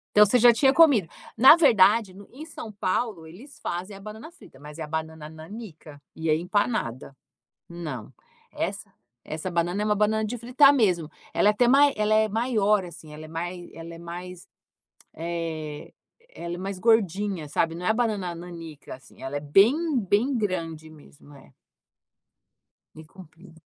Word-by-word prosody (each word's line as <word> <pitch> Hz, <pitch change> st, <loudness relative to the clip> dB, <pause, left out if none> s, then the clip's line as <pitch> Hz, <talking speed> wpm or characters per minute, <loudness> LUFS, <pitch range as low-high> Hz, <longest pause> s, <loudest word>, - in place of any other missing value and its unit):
Então, 210 Hz, -, +8 dB
você 250 Hz, +5 st, +3 dB
já 240 Hz, 0 st, +7 dB
tinha 265 Hz, +4 st, +3 dB
comido. 275 Hz, -, +5 dB, 0.3 s
Na 265 Hz, +8 st, +9 dB
verdade, 215 Hz, -, +4 dB
no 200 Hz, +1 st, -14 dB
em 285 Hz, +5 st, -9 dB
São 230 Hz, -8 st, -9 dB
Paulo, 200 Hz, -3 st, -2 dB
eles 230 Hz, -, -14 dB
fazem 185 Hz, +4 st, -5 dB
a -, -, -12 dB
banana 215 Hz, +9 st, -10 dB
frita, 350 Hz, -, -18 dB
mas 150 Hz, +2 st, -12 dB
é -, -, -4 dB
a -, -, -5 dB
banana 160 Hz, 0 st, -5 dB
nanica 160 Hz, -3 st, -11 dB, 0.2 s
e 160 Hz, 0 st, -4 dB
é 155 Hz, -, +5 dB
empanada. 175 Hz, -, -2 dB, 0.5 s
Não. 155 Hz, -10 st, -7 dB, 0.4 s
Essa -, -, -5 dB, 0.3 s
essa 160 Hz, +4 st, -5 dB
banana 175 Hz, +3 st, -1 dB
é 210 Hz, -, 0 dB
uma 210 Hz, -, +2 dB
banana 215 Hz, +1 st, +1 dB
de 225 Hz, +3 st, -4 dB
fritar 250 Hz, +4 st, +5 dB
mesmo. 180 Hz, -, +1 dB, 0.2 s
Ela 205 Hz, -, +3 dB
é -, -, +5 dB
até 240 Hz, +3 st, +2 dB
mai 280 Hz, +3 st, +5 dB
ela 215 Hz, 0 st, 0 dB
é 220 Hz, 0 st, +3 dB
maior 215 Hz, -3 st, +1 dB
assim, 165 Hz, -3 st, -12 dB
ela 155 Hz, +1 st, -10 dB
é -, -, -11 dB
mai 175 Hz, +2 st, -6 dB
ela 165 Hz, +1 st, -10 dB
é 165 Hz, -, -11 dB
mais, 175 Hz, +1 st, -9 dB, 0.7 s
eh, 160 Hz, -3 st, -5 dB, 0.4 s
ela 170 Hz, 0 st, -6 dB
é -, -, -7 dB
mais 195 Hz, +1 st, -5 dB
gordinha, 200 Hz, -6 st, +1 dB
sabe, 165 Hz, +2 st, -1 dB
não 180 Hz, -, -6 dB
é -, -, +3 dB
a -, -, +3 dB
banana 210 Hz, -7 st, -1 dB
nanica, 165 Hz, -5 st, -10 dB
assim 130 Hz, -, -19 dB
ela 135 Hz, +2 st, -5 dB
é 145 Hz, -, -2 dB
bem, 195 Hz, -, +4 dB, 0.2 s
bem 215 Hz, +7 st, +1 dB
grande 165 Hz, -7 st, -3 dB
mesmo. 145 Hz, -1 st, -17 dB
É. 135 Hz, -, -19 dB, 1.4 s
Bem 155 Hz, -, -12 dB
comprida. 165 Hz, -1 st, -16 dB
185 Hz, 175 wpm, -25 LUFS, 160-220 Hz, 1.4 s, Na